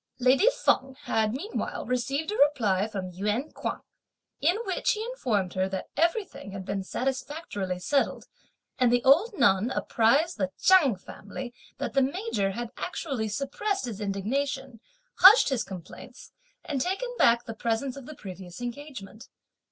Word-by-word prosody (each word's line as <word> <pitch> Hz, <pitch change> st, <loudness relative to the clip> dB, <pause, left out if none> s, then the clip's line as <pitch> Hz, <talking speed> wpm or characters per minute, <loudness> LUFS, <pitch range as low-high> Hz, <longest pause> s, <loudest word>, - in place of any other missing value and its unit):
Lady 260 Hz, -, +5 dB
Feng 265 Hz, -, +1 dB
had 220 Hz, -5 st, +1 dB
meanwhile 335 Hz, -, -4 dB
received 270 Hz, -, -1 dB
a -, -, -2 dB
reply 220 Hz, -9 st, +3 dB
from 190 Hz, -4 st, -5 dB
Yün 210 Hz, -, -2 dB
Kuang, -, -, -4 dB, 0.6 s
in 345 Hz, +7 st, +2 dB
which 390 Hz, +6 st, +1 dB
he 430 Hz, -, -3 dB
informed 235 Hz, -, -1 dB
her 185 Hz, 0 st, 0 dB
that 190 Hz, -1 st, -5 dB
everything 335 Hz, -, -1 dB
had 190 Hz, -1 st, -6 dB
been 195 Hz, 0 st, -2 dB
satisfactorily 260 Hz, -, -3 dB
settled, 275 Hz, +10 st, 0 dB, 0.5 s
and 250 Hz, -2 st, +4 dB
the 245 Hz, 0 st, +2 dB
old 355 Hz, -, +4 dB
nun 215 Hz, -2 st, +4 dB
apprised 260 Hz, +7 st, +2 dB
the 190 Hz, -2 st, 0 dB
Chang 335 Hz, -, +5 dB
family 215 Hz, +6 st, -9 dB, 0.2 s
that -, -, -4 dB
the 275 Hz, -, +4 dB
major 275 Hz, -, 0 dB
had 235 Hz, +1 st, -5 dB
actually 275 Hz, -11 st, -3 dB
suppressed 285 Hz, -, -2 dB
his 220 Hz, -4 st, -6 dB
indignation, 255 Hz, +6 st, -2 dB, 0.4 s
hushed 395 Hz, +1 st, +9 dB
his 265 Hz, -4 st, 0 dB
complaints, 180 Hz, -4 st, -11 dB, 0.3 s
and 285 Hz, -6 st, -2 dB
taken 385 Hz, -, -1 dB
back 235 Hz, 0 st, +5 dB
the 225 Hz, -, -5 dB
presents 230 Hz, +4 st, -2 dB
of 275 Hz, -3 st, -10 dB
the 305 Hz, -, -8 dB
previous 185 Hz, -5 st, -9 dB
engagement. 245 Hz, -3 st, -8 dB
250 Hz, 150 wpm, -27 LUFS, 205-295 Hz, 0.6 s, hushed